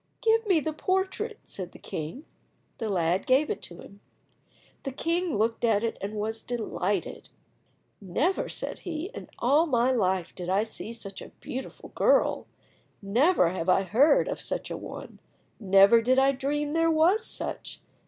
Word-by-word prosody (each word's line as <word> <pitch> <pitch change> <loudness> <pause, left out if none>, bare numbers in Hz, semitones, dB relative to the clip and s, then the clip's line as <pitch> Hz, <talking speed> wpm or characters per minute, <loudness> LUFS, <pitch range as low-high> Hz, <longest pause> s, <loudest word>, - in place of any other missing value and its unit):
"Give 450 -1 +2
me 370 -5 +4
the 310 +1 -3
portrait," 380 +6 -1
said 185 -3 -7
the - - -11
king. 165 - -6 0.5
The 225 - -2
lad 180 -1 0
gave 270 +4 +3
it - - -4
to 175 0 -8
him. 200 - -14 0.8
The 275 - -4
king 335 - -1
looked 225 +2 0
at 225 -2 +3
it 230 - -2
and 205 +2 -4
was 220 +1 -3
delighted. 210 -6 -3 0.7
"Never," 255 - 0
said - - -4
he, 340 +3 -5
"in - - -9
all 290 +7 +3
my 250 -2 +2
life 190 -7 0
did 180 -1 -6
I 195 +3 +2
see 225 0 -6
such 210 -4 -7
a - - -9
beautiful 260 +1 -7
girl, - - +2 0.5
never 230 - +3
have 180 0 -3
I 190 - +4
heard 265 - +4
of - - -4
such - - -4
a - - -2
one, - - -9 0.4
never 200 +2 +6
did 255 +3 +2
I 270 +1 +5
dream 290 +2 -2
there 330 0 +3
was 335 +7 +3
such. - - -5
240 Hz, 165 wpm, -27 LUFS, 200-315 Hz, 0.8 s, never